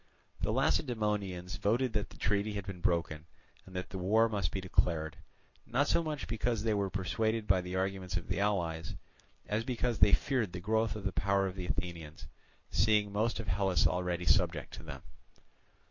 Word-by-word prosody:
The -, -, +1 dB
Lacedaemonians 100 Hz, -, 0 dB
voted 120 Hz, +4 st, +1 dB
that 105 Hz, -1 st, -1 dB
the -, -, -14 dB
treaty 100 Hz, +2 st, 0 dB
had 100 Hz, -2 st, -4 dB
been 95 Hz, -2 st, -6 dB
broken, 85 Hz, -2 st, 0 dB, 0.4 s
and 95 Hz, -, -12 dB
that 90 Hz, -, -4 dB
the 95 Hz, -, -4 dB
war 110 Hz, +5 st, +4 dB
must 100 Hz, -7 st, -1 dB
be 95 Hz, -, -2 dB
declared, 80 Hz, -4 st, 0 dB, 0.5 s
not -, -, +2 dB
so -, -, +3 dB
much 155 Hz, -4 st, -3 dB
because 115 Hz, 0 st, -1 dB
they 110 Hz, -1 st, +2 dB
were 100 Hz, -1 st, 0 dB
persuaded 110 Hz, +4 st, -1 dB
by 95 Hz, -2 st, +3 dB
the 90 Hz, +1 st, -5 dB
arguments 95 Hz, -1 st, -1 dB
of 85 Hz, -, -4 dB
the -, -, -1 dB
allies, 90 Hz, -3 st, -1 dB, 0.5 s
as 105 Hz, +2 st, 0 dB
because 120 Hz, -1 st, -1 dB
they 100 Hz, -, +6 dB
feared 115 Hz, -9 st, +1 dB
the 90 Hz, -, -4 dB
growth 110 Hz, +4 st, +1 dB
of 105 Hz, -, -6 dB
the 100 Hz, -, -1 dB
power 100 Hz, +1 st, +1 dB
of 95 Hz, -1 st, -3 dB
the 90 Hz, -2 st, -5 dB
Athenians, 85 Hz, -5 st, -4 dB, 0.5 s
seeing 105 Hz, +3 st, +3 dB
most 110 Hz, +3 st, 0 dB
of 115 Hz, -, -5 dB
Hellas 95 Hz, 0 st, +2 dB
already 90 Hz, -1 st, 0 dB
subject 80 Hz, -, +2 dB
to -, -, -7 dB
them. -, -, -8 dB
100 Hz, 185 wpm, -32 LUFS, 90-110 Hz, 0.5 s, they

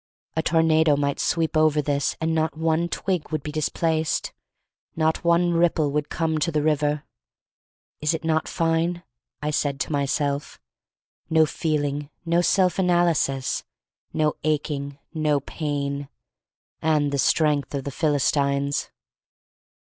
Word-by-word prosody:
A 160 Hz, -, +2 dB
tornado 160 Hz, -2 st, +3 dB
might 140 Hz, -1 st, -1 dB
sweep 165 Hz, -2 st, 0 dB
over 155 Hz, -1 st, +4 dB
this 145 Hz, -1 st, 0 dB
and 160 Hz, 0 st, 0 dB
not 160 Hz, -1 st, 0 dB
one 165 Hz, +1 st, +1 dB
twig 185 Hz, -4 st, -2 dB
would 155 Hz, 0 st, -3 dB
be 150 Hz, -, -4 dB
dis 155 Hz, -1 st, -1 dB
placed, 160 Hz, -2 st, -1 dB, 0.6 s
not 160 Hz, 0 st, +1 dB
one 170 Hz, 0 st, +3 dB
ripple 165 Hz, -3 st, +2 dB
would 150 Hz, 0 st, -1 dB
come 160 Hz, -2 st, -1 dB
to 160 Hz, +3 st, 0 dB
the 150 Hz, -1 st, 0 dB
river. 150 Hz, -1 st, +1 dB, 1.0 s
Is 150 Hz, +2 st, +1 dB
it 160 Hz, -, -6 dB
not 160 Hz, -1 st, +1 dB
fine! 165 Hz, +1 st, 0 dB, 0.4 s
I 150 Hz, -, 0 dB
said 140 Hz, -2 st, -1 dB
to -, -, -2 dB
my 140 Hz, -2 st, 0 dB
self. 140 Hz, 0 st, -2 dB, 0.7 s
No 160 Hz, -1 st, +5 dB
feeling, 145 Hz, -2 st, -2 dB, 0.2 s
no 170 Hz, +1 st, +3 dB
self 185 Hz, +1 st, +2 dB
analysis, 175 Hz, -7 st, +1 dB, 0.5 s
no 155 Hz, -1 st, +1 dB
aching, 145 Hz, -2 st, -1 dB, 0.2 s
no 155 Hz, -3 st, +1 dB
pain 140 Hz, -1 st, -3 dB, 0.4 s
— -, -, -61 dB
and 150 Hz, -2 st, +2 dB
the 140 Hz, -, -1 dB
strength 150 Hz, 0 st, +2 dB
of 135 Hz, -, -3 dB
the 140 Hz, -, -4 dB
Philistines. 140 Hz, -1 st, +1 dB
155 Hz, 140 wpm, -24 LUFS, 145-160 Hz, 1.0 s, No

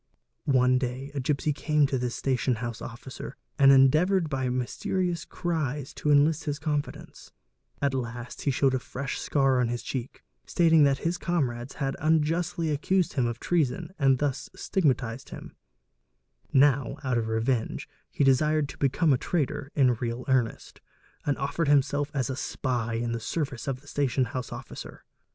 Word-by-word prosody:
One 130 Hz, -1 st, +4 dB
day 130 Hz, +2 st, -4 dB
a 145 Hz, -, -2 dB
gipsy 145 Hz, +3 st, 0 dB
came 150 Hz, 0 st, +2 dB
to 135 Hz, -2 st, -1 dB
this 120 Hz, -1 st, -2 dB
station 130 Hz, -1 st, 0 dB
house 120 Hz, 0 st, -5 dB
officer 125 Hz, +3 st, -8 dB, 0.2 s
and 135 Hz, -1 st, +8 dB
endeavoured 155 Hz, +8 st, +5 dB
_ 160 Hz, -, -4 dB
by 130 Hz, -2 st, -1 dB
mysterious 170 Hz, +8 st, -2 dB
cries 150 Hz, -5 st, -3 dB
to 150 Hz, -, -2 dB
enlist 150 Hz, +2 st, +4 dB
his 145 Hz, -2 st, -2 dB
confidence: 150 Hz, -1 st, -4 dB, 0.5 s
at 140 Hz, -1 st, +2 dB
last 120 Hz, -1 st, -5 dB
he -, -, 0 dB
showed 135 Hz, 0 st, +2 dB
a 130 Hz, -, +1 dB
fresh 130 Hz, +1 st, -5 dB
scar 135 Hz, -3 st, +2 dB
on 120 Hz, -, +2 dB
his 120 Hz, +1 st, -3 dB
cheek, 130 Hz, -2 st, -5 dB, 0.2 s
stating 160 Hz, -, +4 dB
that 140 Hz, -1 st, +3 dB
his 175 Hz, +2 st, 0 dB
comrades 130 Hz, -7 st, -2 dB
had 135 Hz, -2 st, -2 dB
unjustly 160 Hz, +2 st, +1 dB
accused 175 Hz, +4 st, +1 dB
him 130 Hz, -4 st, +1 dB
of 120 Hz, 0 st, -4 dB
treason 160 Hz, 0 st, 0 dB
and 135 Hz, -2 st, +4 dB
thus 140 Hz, -1 st, -2 dB
stigmatised 130 Hz, -8 st, -1 dB
him; -, -, -10 dB, 1.0 s
now 135 Hz, -2 st, +3 dB
out 130 Hz, -3 st, +1 dB
of 110 Hz, -, -2 dB
revenge 110 Hz, +2 st, -1 dB, 0.2 s
he -, -, 0 dB
desired 150 Hz, +2 st, +3 dB
to -, -, -10 dB
become 140 Hz, +3 st, +3 dB
a 125 Hz, -, +1 dB
traitor 145 Hz, -4 st, -2 dB
in 130 Hz, -4 st, +4 dB
real 120 Hz, +1 st, -4 dB
earnest; 130 Hz, -4 st, -1 dB, 0.5 s
and 145 Hz, -, +1 dB
offered 140 Hz, +3 st, -1 dB
himself 145 Hz, 0 st, +2 dB
as 130 Hz, -4 st, 0 dB
a 130 Hz, -, -3 dB
spy 120 Hz, -4 st, -2 dB
in 115 Hz, +1 st, -1 dB
the 115 Hz, -, -2 dB
service 140 Hz, +2 st, -3 dB
of 130 Hz, -1 st, -2 dB
the 145 Hz, -, -21 dB
station 135 Hz, -3 st, +1 dB
house 125 Hz, +2 st, -5 dB
officer. -, -, -9 dB
135 Hz, 170 wpm, -27 LUFS, 125-150 Hz, 1.0 s, and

